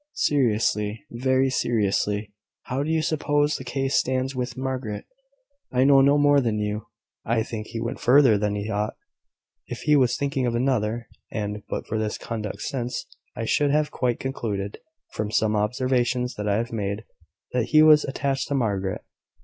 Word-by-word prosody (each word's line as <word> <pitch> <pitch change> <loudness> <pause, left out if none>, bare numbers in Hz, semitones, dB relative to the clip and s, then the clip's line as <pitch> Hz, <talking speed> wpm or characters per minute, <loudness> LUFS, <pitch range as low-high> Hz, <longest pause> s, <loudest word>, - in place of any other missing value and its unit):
Seriously 110 -5 +1
very 130 +2 +1
seriously 105 -3 0 0.3
how 130 +2 -2
do 145 - -2
you 160 -1 +1
suppose 145 -1 +1
the - - -5
case 135 +1 -2
stands 130 +1 +1
with 125 -1 -3
Margaret?" 130 -6 -3 0.7
"I 125 0 +3
know 135 0 +6
no 140 +2 +5
more 145 -1 +5
than 115 -4 0
you. 105 +1 -3 0.4
I 115 0 +1
think 110 -1 -6
he 115 - -5
went 115 +3 -4
further 130 -3 +5
than 105 0 0
he 105 0 -3
ought, 105 -1 -2 0.7
if - - -6
he 150 -1 +3
was 125 -3 +3
thinking 140 -2 -1
of 120 - -1
another; 120 -2 0 0.2
and, 105 -1 -3
but - - -3
for 110 - -3
his 110 -1 -2
conduct 110 -3 -5
since, 125 -3 -3 0.3
I 115 - -3
should 145 +5 +2
have 150 +1 +1
quite 125 -2 -1
concluded, 105 -7 -3 0.3
from 105 0 -2
some 110 0 +1
observations 125 +3 0
that 105 0 -3
I 105 +3 +1
made, 105 -1 -3 0.5
that 125 -3 +1
he 155 +5 +5
was 155 -1 +7
attached 135 0 -2
to 140 - -1
Margaret." 100 -7 -1
120 Hz, 170 wpm, -25 LUFS, 105-135 Hz, 0.7 s, was